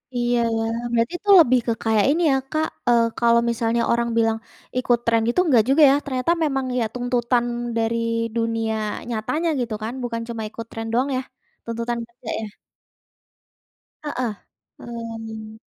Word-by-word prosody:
Iya 240 0 +1 0.2
ya, 225 - 0 0.3
berarti 230 +6 +1
tu 410 - -4
lebih 255 -6 +5
ke 230 - +2
kayak 220 -2 +3
ini 315 +5 +2
ya 270 - +3
Kak, 310 0 +1 0.2
eee, 235 -1 +5 0.2
kalau 235 -1 +4
misalnya 235 0 0
orang 235 0 +1
bilang 225 -1 +2 0.4
ikut 245 -2 +2
tren 230 -1 +3
gitu 240 - +1
enggak 250 -9 +5
juga 290 +3 +5
ya, - - +4
ternyata 260 +4 0
memang 270 -3 0
ya - - +2
tuntutan 245 -1 0 0.3
dari 225 0 +1 0.4
dunia 225 -1 0 0.4
nyatanya 270 +9 -1
gitu 235 -3 -2
kan, 225 +3 -3
bukan 230 -1 -3
cuma 230 -2 -5
ikut 230 +1 -8
tren 225 0 -5
doang 255 +4 +2
ya. - - -1 0.4
Tuntutan 235 +1 -3
kerja 235 +1 -11
ya? 220 - -4 1.6
Heeh. 255 -6 -2 0.5
Hmm. 225 -2 -7
235 Hz, 155 wpm, -22 LUFS, 230-250 Hz, 1.6 s, lebih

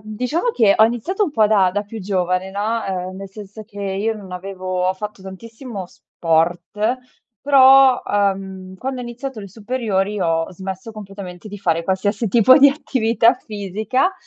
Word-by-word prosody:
diciamo 250 - -1
che 210 - +4
ho 220 - +7
iniziato 240 - 0
un 305 - -5
po' 215 -4 +3
da 190 -4 +3
da 205 +1 -1
più 220 +2 -9
giovane 185 -1 -1
no, 215 +3 -2
ehm, 185 -1 -4
nel 195 0 -8
senso 205 +2 -11
che 205 -1 -11
io 200 +3 -1
non 200 -3 -11
avevo 185 0 -2
fatto 210 +1 -7
tantissimo 220 +3 -8
sport, 175 +9 -1 0.4
però, 270 -2 +6
ehm, 190 -2 -2
quando 260 +4 -4
ho - - -5
iniziato 240 0 -6
le 200 - -9
superiori 210 -2 -2
ho 165 -2 0
smesso 190 +4 -7
completamente 195 -2 -9
di 205 0 -8
fare 165 -3 0
qualsiasi 200 +5 -1
tipo 235 +4 +6
di 285 -1 +8
attività 235 -5 +2
fisica. 215 - -2
205 Hz, 160 wpm, -20 LUFS, 190-230 Hz, 0.4 s, di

